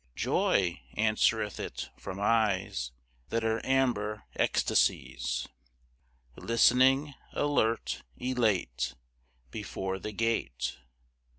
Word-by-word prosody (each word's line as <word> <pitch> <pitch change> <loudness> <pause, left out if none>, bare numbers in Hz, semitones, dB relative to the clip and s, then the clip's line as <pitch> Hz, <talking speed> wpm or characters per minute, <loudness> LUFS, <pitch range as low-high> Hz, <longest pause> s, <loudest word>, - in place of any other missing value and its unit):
"Joy," 90 -3 +1
answereth 110 -1 +2
it - - -5
from 100 0 -7
eyes 100 - +1 0.4
That 115 0 0
are 110 0 0
amber 120 -6 +1
ecstasies, - - +1 0.9
Listening, 130 +5 +4 0.2
alert, 145 -6 +1 0.2
elate, 95 - 0 0.6
Before 95 0 -4
the 105 - -5
gate. 65 - -1
110 Hz, 80 wpm, -30 LUFS, 95-115 Hz, 0.9 s, Listening